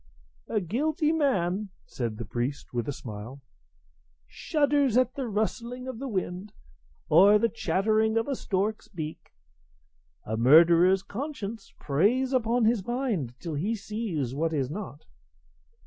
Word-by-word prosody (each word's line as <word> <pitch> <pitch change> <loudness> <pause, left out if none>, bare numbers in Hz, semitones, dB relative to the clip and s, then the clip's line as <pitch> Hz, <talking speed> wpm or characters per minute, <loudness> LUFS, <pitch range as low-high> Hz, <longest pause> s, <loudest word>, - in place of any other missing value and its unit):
"A 215 - 0
guilty 300 - 0
man," 210 - 0 0.2
said 115 -4 -4
the 115 - -5
priest, 125 +7 -4
with 120 -2 -2
a - - 0
smile, 120 +1 -8 0.9
"shudders 285 - +1
at 255 0 +3
the 270 -3 -4
rustling 235 +4 -3
of 255 -3 -6
the 275 - -4
wind 190 -2 -4 0.5
or 195 +7 +7
the 230 - +2
chattering 220 +4 +1
of 225 - 0
a 280 - -1
stork's 210 0 -2
beak; 160 -5 -7 0.9
a 110 - -2
murderer's 170 +9 +6
conscience 220 -2 -6
preys 220 - +1
upon 240 -1 +2
his 225 -3 +2
mind 220 - -2
till 165 -3 -5
he 190 +11 -1
sees 200 - -3
what 160 +3 -1
is 135 -3 -1
not. 185 -5 -7
205 Hz, 135 wpm, -27 LUFS, 160-240 Hz, 0.9 s, or